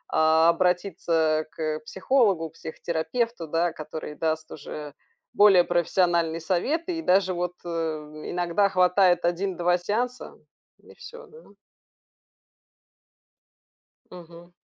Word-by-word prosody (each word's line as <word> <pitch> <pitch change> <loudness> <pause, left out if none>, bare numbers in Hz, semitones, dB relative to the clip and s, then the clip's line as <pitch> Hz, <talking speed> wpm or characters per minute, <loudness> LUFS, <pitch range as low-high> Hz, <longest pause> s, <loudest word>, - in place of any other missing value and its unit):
а, 160 +1 +4
обратиться 170 -3 +1
к 155 -1 -3
психологу, 195 - +1
к - - -27
психотерапевту, 165 +5 -3
да. 165 +2 0
Который 155 -1 -8
даст 160 0 -2
уже 150 0 -8 0.4
более 200 -4 +6
профессиональные 170 -1 +1
советы, 310 - -1
и - - -4
даже 190 - +2
вот, 175 0 -3
э, 175 - -5 0.6
иногда 175 +3 +1
хватает 180 -1 +3
1-2 175 0 0
сеанса, 235 +7 -3 0.5
и - - -16
всё, 480 +1 -12
да. 470 +2 -17 2.6
Мгм. 175 0 -13
175 Hz, 100 wpm, -25 LUFS, 160-190 Hz, 2.6 s, более